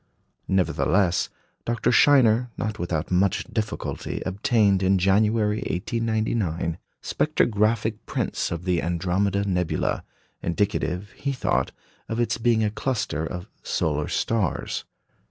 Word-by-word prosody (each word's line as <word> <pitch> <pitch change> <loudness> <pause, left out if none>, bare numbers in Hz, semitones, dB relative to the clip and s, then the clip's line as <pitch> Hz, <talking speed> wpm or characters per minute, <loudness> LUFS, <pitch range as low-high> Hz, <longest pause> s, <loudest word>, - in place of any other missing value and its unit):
Nevertheless, 95 -1 +2 0.3
Dr. 120 +1 +1
Scheiner, 125 -3 +5
not 105 -1 -3
without 85 -2 -2
much 90 +1 +2
difficulty, 110 -1 -3
obtained, 100 -1 +2
in 95 0 +3
January, 105 +3 +3
1899, 110 -6 -1 0.2
spectrographic 110 -6 +1
prints - - -1
of 85 +1 -4
the 90 -2 +1
Andromeda 95 +4 0
nebula, 90 -3 0 0.4
indicative, 100 +1 -1
he 140 - -3
thought, 130 - 0 0.4
of 115 - -2
its 115 -1 0
being 115 -1 +3
a 105 - +1
cluster 110 - -2
of 90 +2 -6
solar 75 -1 -1
stars. 110 -7 -1
100 Hz, 110 wpm, -25 LUFS, 90-115 Hz, 0.4 s, Scheiner